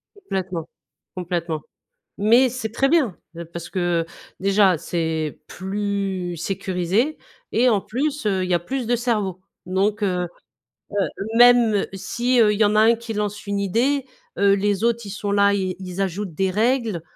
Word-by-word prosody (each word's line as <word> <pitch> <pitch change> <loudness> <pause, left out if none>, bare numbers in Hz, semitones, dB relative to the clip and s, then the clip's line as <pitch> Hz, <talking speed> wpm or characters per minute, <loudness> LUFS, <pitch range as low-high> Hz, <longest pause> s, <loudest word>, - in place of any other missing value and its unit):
Complètement. 185 - -4 0.5
Complètement. 170 -3 -3 0.6
Mais 235 +6 +5
c'est 240 -3 -4
très 270 +5 +1
bien! 275 - +2 0.2
Heu, 170 - -6
parce 170 +1 -8
que, 175 -2 0
heu, - - -19 0.3
déjà 195 -2 +4
c'est 160 -2 -2
plus 195 -2 -3
sécurisé 190 - -1 0.3
et 250 +2 +3
en 210 -4 +3
plus, 285 +6 -2
heu, 190 -3 +1
il 185 - -4
y - - +3
a 175 - +2
plus 255 +6 -3
de 245 - +2
cerveaux 210 -6 -1 0.3
donc, 200 +3 0
heu, 180 -3 0 0.6
heu, - - -7 0.4
même 240 -4 +6
si, 240 +6 0
heu, 210 -2 +5
il 205 - -4
y - - +6
en 205 +1 +2
a 215 - +6
un 230 +1 +5
qui 230 0 -7
lance 210 0 -3
une 200 0 -1
idée, 250 +8 +1 0.3
heu, 200 0 +4
les 200 +1 0
autres 235 -1 +1
ils - - -7
sont 205 0 -3
là 200 0 +4
ils 190 -2 -1
ils 185 0 -7
ajoutent 190 -2 -3
des 190 +1 +1
règles, 225 -2 +1
200 Hz, 175 wpm, -22 LUFS, 185-230 Hz, 0.6 s, même